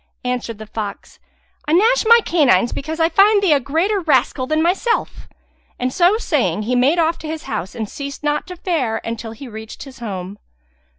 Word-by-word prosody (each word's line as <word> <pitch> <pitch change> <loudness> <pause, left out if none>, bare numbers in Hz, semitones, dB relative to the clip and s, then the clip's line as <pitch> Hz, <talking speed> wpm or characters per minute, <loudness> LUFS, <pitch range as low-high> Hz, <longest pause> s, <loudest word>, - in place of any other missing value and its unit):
Answered 245 -3 -3
the 215 - -9
fox, 210 -2 -7 0.5
"I 300 - +1
gnash 450 +8 +4
my 465 +1 +7
canines 250 - +3
because 315 +4 -5
I 325 - +4
find 405 +4 +5
thee 350 -6 +5
a 285 - +3
greater 330 - 0
rascal 300 -5 +1
than 310 +2 +1
myself;" 370 +8 0 0.5
and 255 +1 -2
so 360 +4 +4
saying 230 - 0
he 250 +4 -1
made 265 +7 +3
off 330 0 +1
to 315 - -8
his 315 0 -5
house 205 -2 -5
and 220 -3 -4
ceased 280 +5 -7
not 295 0 -1
to 365 - -7
fare 315 -11 -1
until 230 0 -5
he 260 +4 -10
reached 220 -1 -9
his 270 -2 -13
home. 200 -3 -6
280 Hz, 190 wpm, -19 LUFS, 230-340 Hz, 0.5 s, my